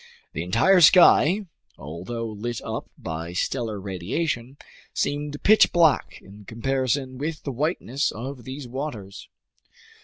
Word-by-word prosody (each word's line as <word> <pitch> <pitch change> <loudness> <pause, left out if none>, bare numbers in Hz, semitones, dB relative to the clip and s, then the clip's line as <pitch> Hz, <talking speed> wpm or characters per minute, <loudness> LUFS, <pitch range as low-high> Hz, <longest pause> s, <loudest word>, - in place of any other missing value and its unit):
The 80 - -3
entire 120 - +4
sky, 180 +3 +6 0.3
although 90 +11 -6
lit 115 +2 -5
up - - -5
by 80 +2 -6
stellar 110 +2 -2
radiation, 115 - -3 0.4
seemed 145 0 -2
pitch 215 +1 +6
black 165 -4 +2
in 100 +2 -14
comparison 130 +2 -2
with 155 +2 -4
the 140 - -3
whiteness 140 0 -1
of 125 +3 -7
these 130 +2 -7
waters. 120 -7 -7
130 Hz, 120 wpm, -24 LUFS, 105-145 Hz, 0.4 s, sky